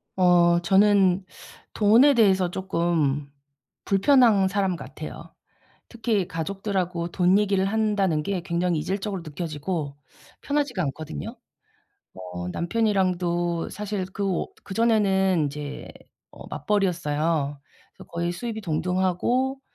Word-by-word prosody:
어 175 -2 +4
저는 195 0 +3 0.5
돈에 230 +7 +5
대해서 190 -6 +3
쪼끔 170 -6 -1 0.6
불편한 205 -1 +4
사람 190 -1 0
같아요. - - -9 0.6
특히 225 -5 -1
가족들하고 180 0 -3
돈 180 +3 +3
얘기를 200 -2 +1
한다는 200 -6 +1
게 185 +2 -2
굉장히 170 -1 0
이질적으로 195 +2 -3
느껴지고 155 -1 -4 0.5
편하지가 285 -9 -1
않거든요. 160 - -5 0.8
뭐 90 -1 -7
남편이랑도 175 -4 0
사실 205 -2 -4
그 200 - -3
오 190 -3 -2
그전에는 195 -4 +2
인제 145 0 -6 0.4
어 - - -12
맞벌이였어요. 155 -5 -1 0.3
그래서 - - -15
거의 170 +1 -2
수입이 225 +3 -5
동등하고 185 - 0
185 Hz, 265 characters per minute, -25 LUFS, 170-205 Hz, 0.8 s, 돈에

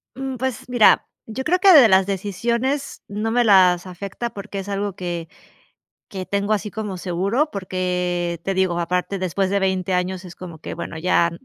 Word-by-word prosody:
Mm, 265 0 -4
pues 255 -1 -3
mira, 245 -3 +5 0.2
yo 225 +4 -5
creo 360 +1 +2
que 385 -1 +7
de 275 -8 +9
las 190 0 +5
decisiones 235 +8 -2
no 215 +2 -3
me 240 0 +3
las 185 -4 +5
afecta, 195 +6 -5
porque 200 -2 -7
es 195 - -7
algo 200 -1 -2
que 175 -3 -4 0.8
que 190 -4 -5
tengo 200 +2 0
así 210 0 -3
como 210 -3 -5
seguro, 195 - -1
porque 180 -3 -2
te 195 - -2
digo, 185 -2 +1
aparte 180 +3 -1
después 185 +1 -1
de 200 - +2
20 190 -1 0
años 180 +1 -1
es 175 - -10
como 170 -3 -9
que, - - -7
bueno, 170 - -6
ya 170 0 +2
195 Hz, 185 wpm, -21 LUFS, 180-220 Hz, 0.8 s, de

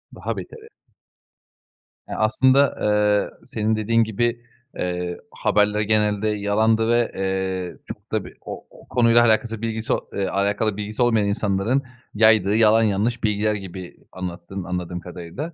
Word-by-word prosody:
Daha - - -4
beteri. 455 -1 -9 1.4
Eee, - - -4
aslında, 130 +5 +3
eee, 105 0 +2
senin 110 0 -1
dediğin 115 +2 +2
gibi, 120 +2 -1 0.4
eee, 90 -1 -3
haberler 105 0 +1
genelde 105 0 +1
yalandı 110 +2 +1
ve, 120 0 +2
eee, 95 -1 -2
çok - - -10
da - - -1
bir - - -13
o - - -8
o - - -18
konuyla 120 -1 +4
alakası, 115 -1 +1
bilgisi 110 -1 -1 0.2
eee, 100 -1 -1
alakalı 100 +1 0
bilgisi 105 +3 -4
olmayan 115 -4 +3
insanların 100 +6 0 0.3
yaydığı 110 -1 +4
yalan 110 0 +5
yanlış 110 +3 0
bilgiler 105 0 +1
gibi 95 -2 -8
anlattın, 90 +1 -6
anladığım 90 0 -4
kadarıyla. 90 - -7
105 Hz, 135 wpm, -22 LUFS, 95-115 Hz, 1.4 s, yalan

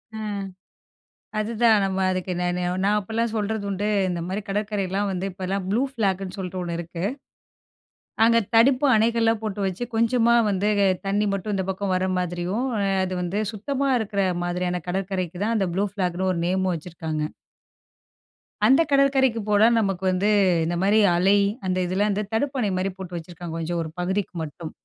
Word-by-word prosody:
அ. - - -5 1.2
அதுதான் 220 -1 +3
நம்ம 190 0 -1
அதுக்கு 185 0 -2
நான் 180 0 0 0.3
நான் 210 +1 +3
அப்போலாம் 225 +3 -2
சொல்றது 215 0 -2
உண்டு. 200 +2 -1 0.2
இந்த 175 -1 -2
மாரி 190 +3 -2
கடற்கரைலாம் 200 -1 -1
வந்து 190 +1 -2
இப்போலாம் 190 +1 -3
ப்ளூ 225 +6 +2
ஃப்ளாக்னு 195 -5 -1
சொல்ட்டு 185 -1 -4
ஒண்ணு 170 -1 -3
இருக்கு. 170 0 -6 1.2
அங்க 230 0 +5 0.2
தடுப்பு 255 +5 +5
அணைகள்லாம் 225 0 +2
போட்டு 210 -2 -3
வச்சு 190 +6 -3
கொஞ்சமா 230 +1 +3 0.2
வந்து, 200 +2 +1 0.4
தண்ணி 205 +2 +1
மட்டும் 200 +2 -3
இந்த 190 - -2
பக்கம் 190 0 -1
வர 185 +1 0
மாதிரியும் 180 +7 -2 0.4
அது 185 0 -3
வந்து, 190 +4 -1
சுத்தமா 275 +6 -1
இருக்கற 200 -3 -1 0.2
மாதிரியான 180 0 -2
கடற்கரைக்கு 185 -1 -2
தான் 230 +1 +1
அந்த 195 -3 +1
ப்ளூ 200 +2 +1
ஃப்ளாக்னு 185 -1 -1
ஒரு 170 - -2
நேமும் 185 0 +1
வச்சுருக்காங்க. 160 -2 -4 1.4
அந்த 270 +5 +6
கடற்கரைக்கு 270 -4 +3
போனா 210 +1 +5
நமக்கு 195 -3 -1
வந்து 185 +3 +1 0.3
இந்த 170 +2 -1
மாரி 205 +3 +4 0.2
அலை, 190 +4 +4 0.3
அந்த 185 0 0
இதில 190 +3 +1
வந்து 205 +1 0
தடுப்பணை 255 -3 0
மாரி 190 +1 -1
போட்டு 180 -2 -7
வச்சுருக்காங்க. 170 0 -8
கொஞ்சம் 170 +1 -2
ஒரு 160 - -4
பகுதிக்கு 190 +3 -1
மட்டும். 155 +1 -7
195 Hz, 155 wpm, -24 LUFS, 180-215 Hz, 1.4 s, அந்த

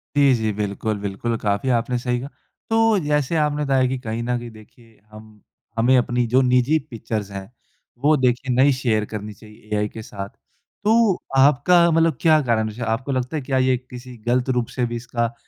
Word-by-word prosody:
जी, 140 -2 +5
जी। 110 -2 -1
बिल्कुल-बिल्कुल, 105 +2 -3
काफ़ी 100 +5 -1
आपने 125 +2 -2
सही 125 0 -1
कहा। 135 +3 -7 0.4
तो 225 -2 +3
जैसे 150 +1 0
आपने 150 -1 0
बताया 135 -2 +2
कि 130 - -2
कहीं 115 -2 -4
न 125 +1 -1
कहीं 120 0 -7
देखिए 110 +1 -18
हम 110 -1 -14 0.4
हमें 120 +3 +4
अपनी 125 0 +1
जो 125 +3 +3
निजी 125 +4 +3
पिक्चर्स 110 -3 -5
हैं, 100 +2 -8 0.5
वो 145 +5 +3
देखिए 125 0 0
नही 135 +2 +5
शेयर 115 -5 0
करनी 105 0 -7
चाहिए 105 0 -17
एआई 105 0 +1
के 110 - -9
साथ। 100 -2 -7
तो, 220 - -1 0.2
आपका 150 +6 +5
मतलब 165 -3 +2
क्या 155 -2 +5
कारण 115 -4 0
जैसे 110 +3 -9
आपको 130 +5 -2
लगता 130 +3 -2
है - - -3
कि 130 - -10
ये 130 -1 +2
किसी 125 0 -11
गलत 125 +2 +1
रूप 125 -2 0
से 125 - +1
भी 120 0 -4
इसका 120 0 -2
125 Hz, 190 wpm, -22 LUFS, 110-135 Hz, 0.5 s, जी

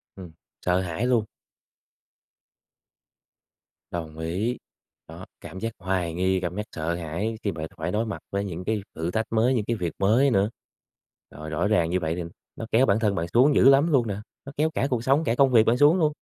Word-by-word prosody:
Ừm, 90 -4 -10 0.3
sợ 90 0 +2
hãi 90 +5 -3
luôn. 120 -4 +2 2.7
Đồng 80 -2 -6
ý, 95 +9 -2 0.5
đó, - - -10 0.2
cảm 95 - -9
giác 115 +2 -3
hoài 90 -2 -1
nghi, 95 +2 +1
cảm 90 -1 -3
giác 105 - -2
sợ 80 +1 -2
hãi 90 +7 -3
khi 100 - 0
bạn 80 -2 -5
phải 80 +1 -3
đối 110 +3 0
mặt 105 -7 -5
với 100 0 -1
những 90 -2 -6
cái 110 +2 -1
thử 80 +2 -3
thách 110 +4 -1
mới, 115 +3 +3
những 110 -5 0
cái 115 - -1
việc 90 -6 -3
mới 115 +8 +4
nữa. 100 -1 +2 0.8
Rồi 75 +3 -8
rõ 80 +6 0
ràng 85 -6 +2
như 90 +2 +1
vậy 80 -1 -2
thì 90 - -4 0.3
nó 115 - -6
kéo 125 +4 +4
bản 100 -1 +2
thân 105 -3 +1
bạn 85 -1 -2
xuống 135 +5 +5
dữ 135 - +7
lắm 140 +5 +4
luôn 125 -5 +3
nè, 100 -2 -3 0.3
nó 140 - -8
kéo 155 +2 +2
cả 135 - +1
cuộc 120 -4 -1
sống, 135 +5 +3
cả 115 - 0
công 135 0 +4
việc 115 -3 +6
bạn 115 +2 +3
xuống 145 +6 +5
luôn. 155 -3 +2
100 Hz, 215 wpm, -25 LUFS, 85-120 Hz, 2.7 s, dữ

